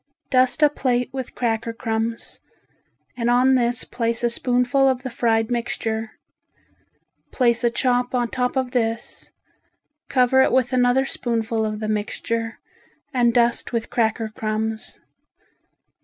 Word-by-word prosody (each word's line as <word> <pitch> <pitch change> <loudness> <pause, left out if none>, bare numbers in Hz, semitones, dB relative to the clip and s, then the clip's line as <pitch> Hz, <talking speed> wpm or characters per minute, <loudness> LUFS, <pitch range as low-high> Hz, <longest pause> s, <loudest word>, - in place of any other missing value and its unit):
Dust 255 +3 +3
a 300 - +7
plate 250 -3 0
with 260 -2 -6
cracker 230 -1 -1
crumbs 225 0 -3 0.8
and 240 -1 -1
on 250 +2 +4
this 240 -2 +1
place 235 0 -2
a 240 - +2
spoonful 250 +3 +2
of 255 -1 -1
the 260 - -5
fried 225 -1 +1
mixture. 225 -2 -2 1.2
Place 240 -2 +2
a 235 - +4
chop 245 +1 0
on 240 -2 0
top 250 0 -1
of 260 -2 -1
this, 230 -2 -2 0.8
cover 260 0 +4
it - - +3
with 255 0 +2
another 250 +1 +3
spoonful 230 -3 -2
of 215 0 -4
the 215 - -3
mixture 225 +2 -2 0.6
and 240 -2 +3
dust 240 0 +1
with 230 -1 -2
cracker 225 -1 0
crumbs. 220 0 -4
240 Hz, 135 wpm, -22 LUFS, 225-250 Hz, 1.2 s, a